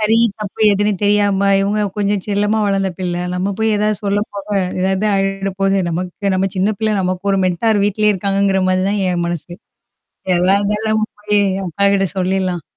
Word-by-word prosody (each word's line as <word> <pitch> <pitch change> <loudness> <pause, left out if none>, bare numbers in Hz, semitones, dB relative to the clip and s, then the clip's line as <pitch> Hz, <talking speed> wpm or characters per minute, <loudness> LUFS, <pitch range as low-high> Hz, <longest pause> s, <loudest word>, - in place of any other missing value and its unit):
சரி, 215 +1 +3 0.2
தப்பு 210 +1 -7
எதுன்னு? 205 +1 +1
தெரியாம, 205 -1 +2
இவுங்க 205 +2 0 0.2
கொஞ்சம் 205 -1 0
செல்லமா 205 +1 0
வளந்த 195 -1 0
பிள்ள. 180 -2 -2 0.2
நம்ம 190 +2 -1
போய் 220 0 +1
ஏதாவது 210 0 0
சொல்ல 200 0 +1
போக, 200 0 -8 0.3
ஏதாவது 190 +3 0
ஆயிட 195 0 -1
போது 195 0 +2
நமக்கு 180 +4 -3
நம்ம 190 +1 +1
சின்ன 195 +3 +1
பிள்ளை 220 -1 0
நமக்கு 185 +1 -3
ஒரு 195 - +2
மென்டார் 205 +4 +1
வீட்லயே 210 +1 +2
இருக்காங்கங்கிற 195 0 0
மாரி 185 0 +1
தான் 205 0 -1
என் 175 -1 -1
மனசு. 175 0 -5 0.9
எல்லாம் 185 +3 +3
இருந்தாலும் 210 +2 -1
நம்ம 215 0 +1 0.2
போயி, 210 0 +2 0.2
என் 195 - -4
அப்பாகிட்ட 200 +2 +2
சொல்லிர்லாம். 185 -2 -1
200 Hz, 175 wpm, -17 LUFS, 190-210 Hz, 0.9 s, சரி